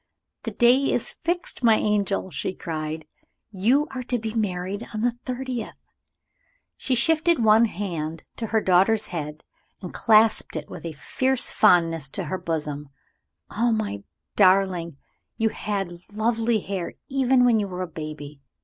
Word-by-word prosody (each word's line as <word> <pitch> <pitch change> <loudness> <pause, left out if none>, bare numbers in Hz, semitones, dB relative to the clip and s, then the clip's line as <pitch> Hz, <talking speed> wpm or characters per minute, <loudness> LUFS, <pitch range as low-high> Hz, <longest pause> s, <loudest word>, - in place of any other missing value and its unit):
"The - - -2
day 255 +3 +4
is 245 - 0
fixed, 345 -5 -2
my 225 -2 +6
angel!" 200 -3 0
she 185 - -3
cried; 155 -1 -5 0.5
"You 235 +9 +2
are 260 -1 -4
to 245 0 -1
be 220 -1 -5
married 200 0 -2
on 215 - -2
the 245 +1 +2
thirtieth!" 250 -1 -5 1.0
She 260 - -1
shifted 320 +1 +3
one 220 +1 +6
hand 170 -6 -4
to 225 - -3
her 220 +1 +1
daughter's 195 +4 +3
head, 150 -2 -5 0.4
and 180 - -8
clasped 220 -3 +3
it 155 -2 -6
with - - -8
a 165 - -6
fierce 260 - 0
fondness 165 -7 +3
to 195 - -2
her 180 +3 -4
bosom. 150 -3 -3 0.6
"Oh, 235 +3 +1
my 215 - -2 0.3
darling, 185 -5 +3 0.4
you 225 0 +2
had 195 -5 -4
lovely 225 +1 0
hair 190 -3 -4
even 260 -2 +3
when 235 -3 +4
you 205 - -1
were 185 -1 -4
a - - -5
baby! 155 -3 -8
210 Hz, 150 wpm, -24 LUFS, 170-235 Hz, 1.0 s, my